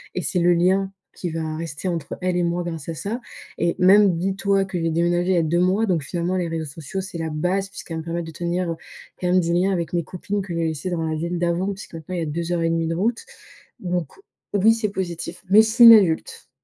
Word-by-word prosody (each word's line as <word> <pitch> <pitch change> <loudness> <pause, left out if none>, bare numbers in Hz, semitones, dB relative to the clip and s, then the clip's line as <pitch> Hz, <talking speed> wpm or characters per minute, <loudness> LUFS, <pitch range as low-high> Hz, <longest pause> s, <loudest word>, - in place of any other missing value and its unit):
et 180 - -1
c'est 180 - -1
le 175 +1 +4
lien 190 +3 +2 0.2
qui 180 - -4
va 160 -1 -3
rester 165 +1 -5
entre 165 -5 -4
elle 180 -1 0
et 175 - +1
moi 170 +1 -1
grâce 165 -4 -6
à - - -2
ça 210 +9 -4 0.4
et 170 - 0
même, 195 0 +6
dis-toi 195 +2 +1
que 190 -2 -4
j'ai 165 0 0
déménagé, 175 +2 +1
il - - +3
y - - +2
a - - +4
2 165 +2 +1
mois 190 +5 +2
donc 170 -6 0
finalement, 175 +5 -2
les 175 -2 -1
réseaux 165 -1 -3
sociaux, 155 +5 -6
c'est 190 -2 -7
la 160 0 -2
base 180 +6 -1
puisqu'elle 165 -4 -7
va - - -3
me - - -12
permettre 170 0 -3
de - - -7
tenir, 175 +1 -2
heu, - - -3 0.5
quand 180 - 0
même, 185 +1 +4
des 170 0 -1
liens 180 +3 +2
avec 170 -3 -2
mes 170 -1 +1
copines 200 +4 -4
que 185 -2 -6
j'ai 165 0 0
laissées 160 +3 -4
dans 165 -2 -1
la 160 - -1
ville 170 +2 -3
d'avant, 175 +3 0
puisque 195 -3 -11
maintenant, 165 +3 -6
il - - -2
y - - -2
a - - -2
2 170 +3 -3
heures 170 - 0
et 165 - +2
1/2 165 0 0
de 165 - -1
route 225 - -1 0.5
donc 175 -3 -2 0.5
oui, 205 +3 +5
c'est 225 -2 -1
positif, 175 -3 -5
même 210 +2 +9
si 220 - -1
c'est 235 +1 +5
une 230 - +12
adulte. 185 -7 +2
175 Hz, 265 wpm, -22 LUFS, 165-190 Hz, 0.5 s, une